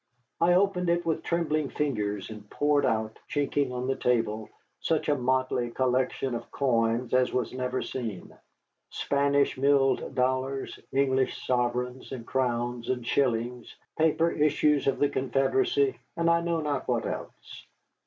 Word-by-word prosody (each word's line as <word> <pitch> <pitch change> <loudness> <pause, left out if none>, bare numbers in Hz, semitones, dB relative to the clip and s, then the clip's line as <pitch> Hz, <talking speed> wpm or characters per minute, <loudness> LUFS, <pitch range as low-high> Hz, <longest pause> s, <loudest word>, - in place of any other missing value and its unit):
I 175 +1 +4
opened 180 -2 +2
it 170 0 +1
with 160 -1 0
trembling 155 -4 0
fingers, 105 -9 -2
and 105 -1 -10
poured 145 0 +2
out, 110 -2 -1
chinking 145 -2 0
on 125 0 -3
the 135 +1 0
table, 110 -3 0 0.3
such 160 -1 0
a 145 - +4
motley 130 -1 0
collection 130 +1 0
of 115 - -5
coins 120 -2 +1
as 130 0 +3
was 125 -2 -1
never 130 0 -2
seen, 110 -8 -6 0.5
Spanish 140 -1 +1
milled 135 -1 +2
dollars, 130 +1 -1
English 135 -1 +1
sovereigns 125 0 -1
and 125 -4 -6
crowns 120 -2 -1
and 125 -2 -1
shillings, 120 -2 -1 0.2
paper 160 +1 +2
issues 150 -1 +2
of 135 - +2
the 145 - +3
Confederacy, 385 - +1 0.2
and 170 0 +3
I 170 0 +3
know 170 -1 -1
not 145 -3 -2
what 120 -2 0
else. - - -7
130 Hz, 145 wpm, -28 LUFS, 125-150 Hz, 0.5 s, I